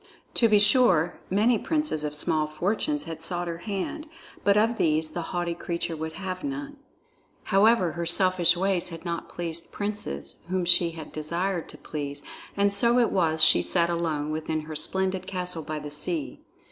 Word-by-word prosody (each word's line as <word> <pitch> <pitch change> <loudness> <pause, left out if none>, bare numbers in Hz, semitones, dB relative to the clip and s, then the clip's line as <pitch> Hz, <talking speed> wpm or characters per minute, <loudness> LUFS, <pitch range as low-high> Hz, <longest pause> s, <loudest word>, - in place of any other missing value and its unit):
To 230 - +3
be 210 - +5
sure, 205 -6 +4
many 215 +4 +2
princes 300 - -1
of 150 0 -4
small 155 0 0
fortunes 210 - -1
had 160 -1 -7
sought 175 +1 -2
her 170 0 -5
hand, 205 - -4 0.4
but 200 0 +4
of 225 +2 +2
these 155 0 +1
the 175 - -4
haughty 175 -2 -2
creature 170 0 -4
would 160 0 -5
have 185 +1 -6
none. 285 0 -5 0.7
However, 200 -2 +3
her 170 0 -4
selfish 180 -1 +5
ways 190 -1 +1
had 165 0 -9
not 170 -1 -4
pleased 170 -1 -6
princes 70 - -4
whom 185 -1 -1
she 175 -1 +4
had 155 - -8
desired 170 +3 -2
to - - -10
please, 145 -1 -6 0.3
and 200 0 +2
so 235 +4 +3
it 240 -2 +3
was 160 -4 +3
she - - +6
sat 170 -1 +1
alone 155 -3 -2
within 155 0 -2
her 155 0 -8
splendid 190 +3 -2
castle 180 -3 -3
by 155 0 -5
the 150 -1 -7
sea. 150 -2 -4
175 Hz, 175 wpm, -26 LUFS, 160-200 Hz, 0.7 s, she